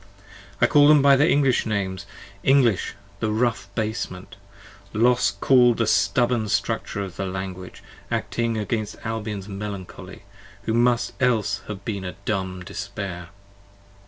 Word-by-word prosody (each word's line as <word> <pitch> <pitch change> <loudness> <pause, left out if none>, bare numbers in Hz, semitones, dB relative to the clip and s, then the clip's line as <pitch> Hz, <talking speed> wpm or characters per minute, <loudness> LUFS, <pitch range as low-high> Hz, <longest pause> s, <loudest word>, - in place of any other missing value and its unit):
(I - - +5
call 145 -1 +5
them 150 -2 +6
by 140 -1 +7
their 145 +4 +4
English 135 -5 +2
names; 100 -2 -2 0.3
English, 125 -5 +3 0.2
the 110 - -1
rough 110 -1 0
basement. 105 -4 -4 0.6
Los 125 +3 +3
built 120 +3 +4
the 115 - +1
stubborn 110 +2 +2
structure 100 0 -1
of 95 -2 -8
the 100 - -2
Language, 95 -1 -6 0.3
acting 115 -1 -1
against 110 0 -2
60 - - -9
Albion's 105 -3 -4
melancholy, 100 -2 -7 0.4
who 110 - -1
must 120 0 +2
else 120 -5 +1
have 100 -2 -7
been 100 -4 -3
a 90 - -6
Dumb 95 -3 -2
despair.) 100 -3 -6
110 Hz, 135 wpm, -23 LUFS, 100-120 Hz, 0.6 s, by